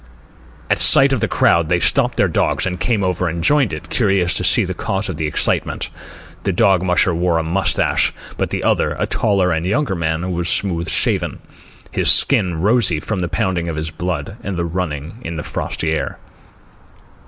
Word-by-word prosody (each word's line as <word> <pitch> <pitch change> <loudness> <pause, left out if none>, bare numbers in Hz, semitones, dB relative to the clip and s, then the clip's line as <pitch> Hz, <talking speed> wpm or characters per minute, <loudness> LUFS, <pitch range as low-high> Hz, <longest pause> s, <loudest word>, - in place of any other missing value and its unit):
At - - +1
sight - - +7
of - - 0
the - - 0
crowd 85 -1 +2
they 90 - +2
stopped 70 - +1
their - - +3
dogs - - 0
and 90 -1 -3
came 110 -5 0
over 90 -1 -1
and 85 +1 -4
joined 140 +1 +3
it, 75 -1 -8
curious 95 -6 +1
to - - -1
see 105 +4 +3
the 95 - -4
cause 100 +1 -3
of 85 - -5
the 80 - -2
excitement. 75 - -2 0.5
The 95 - 0
dog 95 -1 +2
musher 90 0 +1
wore 85 0 0
a 80 - -1
moustache, 90 +5 +1 0.2
but - - -2
the - - -3
other, - - +1
a - - -1
taller 100 -4 0
and 80 0 -1
younger 105 +6 -1
man, 85 +1 -2
was 85 -1 -1
smooth 85 -4 0
shaven, - - 0 0.5
his - - +3
skin 85 -4 +3
rosy 105 -5 +2
from 100 +5 -4
the 85 -2 -2
pounding 85 -2 -2
of 80 - -4
his 80 0 -4
blood 90 +2 -5
and 100 -3 -4
the 85 - -1
running 85 +1 -5
in 85 -6 -6
the 75 - -5
frosty 80 - -3
air. 80 - -3
90 Hz, 195 wpm, -18 LUFS, 80-95 Hz, 0.5 s, sight